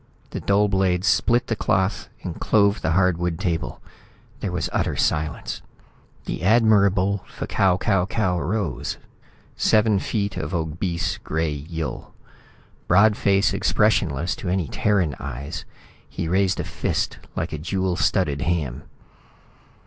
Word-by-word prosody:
The -, -, -4 dB
dull 100 Hz, +1 st, +3 dB
blade 95 Hz, -2 st, +1 dB
split 120 Hz, +6 st, +3 dB
the 115 Hz, -, -1 dB
cloth 95 Hz, 0 st, 0 dB
and -, -, -5 dB
clove 100 Hz, 0 st, +3 dB
the 80 Hz, -, +1 dB
hardwood 90 Hz, -2 st, +1 dB
table. 85 Hz, -4 st, -2 dB, 0.6 s
There 95 Hz, -, -3 dB
was 90 Hz, -3 st, -1 dB
utter -, -, 0 dB
silence. 75 Hz, 0 st, -1 dB, 0.6 s
The -, -, -4 dB
Admirable 100 Hz, -2 st, +3 dB
F'Kau 95 Hz, -2 st, +1 dB
Kau 95 Hz, -2 st, +1 dB
Kau 95 Hz, -5 st, 0 dB
rose, 90 Hz, -, -2 dB, 0.6 s
seven 110 Hz, -2 st, +3 dB
feet 100 Hz, -1 st, -2 dB
of -, -, -3 dB
obese 85 Hz, +1 st, -2 dB
gray 80 Hz, 0 st, -1 dB
Yill. 80 Hz, +3 st, -6 dB, 0.7 s
Broad 100 Hz, +4 st, +5 dB
face 100 Hz, 0 st, +2 dB
expressionless 90 Hz, -7 st, +1 dB
to 90 Hz, -, -4 dB
any 90 Hz, -3 st, 0 dB
Terran 90 Hz, -2 st, +1 dB
eyes, 70 Hz, +5 st, -6 dB, 0.4 s
he -, -, -4 dB
raised 95 Hz, +2 st, +1 dB
a -, -, 0 dB
fist -, -, -2 dB, 0.2 s
like -, -, -3 dB
a 75 Hz, -, -3 dB
jewel 95 Hz, +3 st, -1 dB
studded 75 Hz, -7 st, +1 dB
ham. 75 Hz, -4 st, -2 dB
90 Hz, 130 wpm, -23 LUFS, 80-100 Hz, 0.7 s, Broad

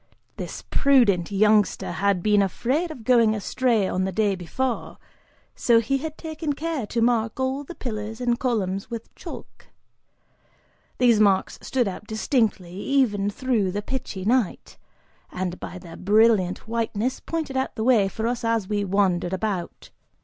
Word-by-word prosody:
This -, -, -6 dB
prudent 235 Hz, -, +3 dB
youngster 210 Hz, -1 st, +3 dB
had 190 Hz, +1 st, 0 dB
been 210 Hz, -1 st, +4 dB
afraid 260 Hz, -, 0 dB
of 260 Hz, -8 st, -9 dB
going 230 Hz, -2 st, +4 dB
astray 220 Hz, -1 st, +1 dB
on 185 Hz, -, -1 dB
the 190 Hz, -, -1 dB
day 205 Hz, +1 st, +1 dB
before, 230 Hz, +8 st, -3 dB, 0.6 s
so 235 Hz, -1 st, +4 dB
he 275 Hz, +5 st, 0 dB
had 310 Hz, +1 st, -6 dB
taken 315 Hz, -2 st, -3 dB
care 305 Hz, -5 st, -3 dB
to 230 Hz, +2 st, 0 dB
mark 230 Hz, -1 st, +1 dB
all 260 Hz, +2 st, -1 dB
the 340 Hz, +5 st, -10 dB
pillars 220 Hz, -2 st, -5 dB
and 240 Hz, -1 st, 0 dB
columns 195 Hz, -6 st, -1 dB
with 230 Hz, -1 st, -7 dB
chalk. -, -, -11 dB, 1.3 s
These 240 Hz, -4 st, +4 dB
marks 200 Hz, -3 st, +2 dB
stood 250 Hz, -4 st, 0 dB
out 195 Hz, +2 st, -6 dB
distinctly, 220 Hz, -5 st, 0 dB
even 205 Hz, -1 st, +1 dB
through 220 Hz, -4 st, 0 dB
the 205 Hz, +2 st, -3 dB
pitchy 210 Hz, -7 st, -5 dB
night, 240 Hz, -2 st, 0 dB, 0.5 s
and 180 Hz, -1 st, -4 dB
by -, -, -7 dB
their 170 Hz, -2 st, -11 dB
brilliant 210 Hz, -2 st, +3 dB
whiteness 230 Hz, +1 st, -1 dB
pointed 320 Hz, -5 st, -4 dB
out 265 Hz, 0 st, -1 dB
the 220 Hz, -, -2 dB
way 225 Hz, -5 st, +4 dB
for 220 Hz, +3 st, -4 dB
us 240 Hz, 0 st, -1 dB
as 230 Hz, -4 st, 0 dB
we 205 Hz, 0 st, 0 dB
wandered 190 Hz, -2 st, +1 dB
about. 190 Hz, -3 st, -4 dB
220 Hz, 155 wpm, -24 LUFS, 195-255 Hz, 1.3 s, been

